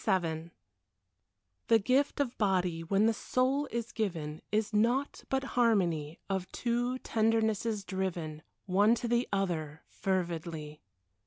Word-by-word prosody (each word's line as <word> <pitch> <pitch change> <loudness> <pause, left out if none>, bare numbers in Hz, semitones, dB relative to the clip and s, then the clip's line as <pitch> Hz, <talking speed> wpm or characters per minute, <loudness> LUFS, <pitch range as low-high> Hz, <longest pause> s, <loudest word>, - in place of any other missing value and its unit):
XXVII 165 -3 0 1.2
The 225 - +6
gift 260 +8 +1
of 265 -4 0
body, 180 -5 +1
when 195 +5 +2
the 225 - +4
soul 260 +5 0
is 235 0 -3
given, 165 -9 -3
Is 215 0 0
naught 240 +6 +1
but 265 0 +1
harmony 175 -10 +2
Of 190 -2 -2
two 245 +1 0
tendernesses 220 -2 +1
driven 175 -5 -3 0.2
One 205 +5 +4
to 240 - -3
the 240 +1 +1
other, 160 -6 -2
fervidly. 165 -5 -3
200 Hz, 125 wpm, -31 LUFS, 170-235 Hz, 1.2 s, The